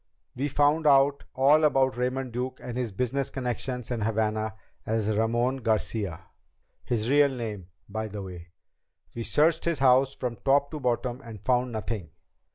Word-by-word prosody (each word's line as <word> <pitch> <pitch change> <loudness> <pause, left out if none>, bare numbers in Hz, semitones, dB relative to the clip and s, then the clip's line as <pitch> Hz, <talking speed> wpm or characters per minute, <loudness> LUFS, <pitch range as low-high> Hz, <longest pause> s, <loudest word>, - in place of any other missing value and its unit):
"We 135 +3 -1
found 145 +3 +2
out 140 0 +4
all 145 +4 +5
about 135 -3 +3
Raymond 125 +1 -2
Duke 130 +2 -3
and 120 - -7
his 125 -3 -2
business 125 +6 -1
connection 125 0 -3
in 120 -2 -2
Havana 110 0 0 0.3
as 110 -1 -1
Ramon 120 +4 +1
Garcia, 110 -6 -1 0.6
his 115 -2 -1
real 145 +2 +5
name 110 -8 -5 0.2
by 110 +2 -4
the 105 -1 -6
way. 90 -2 -9 0.7
We 120 - -5
searched 160 +7 +2
his 170 -2 +1
house 135 0 +4
from 120 -3 -4
top 140 +1 +2
to 155 - -5
bottom 125 0 -1
and 115 -4 -9
found 125 +2 +1
nothing. 110 -5 -4
125 Hz, 160 wpm, -27 LUFS, 110-135 Hz, 0.7 s, all